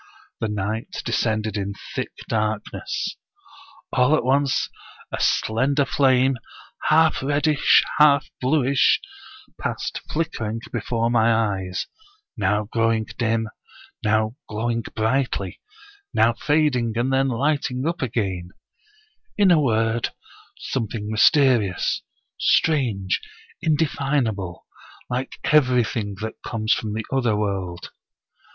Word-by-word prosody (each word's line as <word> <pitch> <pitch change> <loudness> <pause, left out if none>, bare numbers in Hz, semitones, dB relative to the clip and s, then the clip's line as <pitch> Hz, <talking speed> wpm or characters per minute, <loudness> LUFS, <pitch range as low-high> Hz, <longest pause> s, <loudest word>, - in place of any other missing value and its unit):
The 110 - -1
night 105 +2 -3
descended 110 -2 0
in 100 0 -3 0.2
thick - - -3 0.2
darkness. 110 - -2 0.8
All 125 +4 +4
at - - 0
once 135 +2 +2 0.4
a - - -3
slender 135 +6 +2
flame, 130 -2 +3 0.5
half 160 +1 +4
reddish, 145 +2 +4 0.2
half 145 -2 +6
bluish, 135 0 +3 0.6
passed - - -3
flickering 115 -9 -2
before 115 -1 -1
my 115 -1 +4
eyes, 100 -5 0 0.5
now 105 -1 +1
growing 115 +1 0
dim, 115 -1 +1 0.6
now 110 +1 +1
glowing 115 +2 -1
brightly, 110 -4 -1 0.5
now 115 - +4
fading 130 -3 +1
and 130 +3 +1
then 135 0 +3
lighting 135 0 0
up 170 +1 -1
again; 95 -8 -2 0.9
in 200 -3 +5
a 160 -3 +5
word, 115 -2 +1 0.5
something 110 -4 -3
mysterious, 110 - +3 0.4
strange, 120 -12 +2 0.4
indefin 145 -4 +1
able, 95 -5 -5 0.5
like 125 +2 -3
everything 125 -7 +2
that 110 0 -6
comes 110 -1 0
from 105 -2 -3
the 110 -1 -3
other 125 -5 +2
world. 95 -4 -3
115 Hz, 105 wpm, -23 LUFS, 110-135 Hz, 0.9 s, half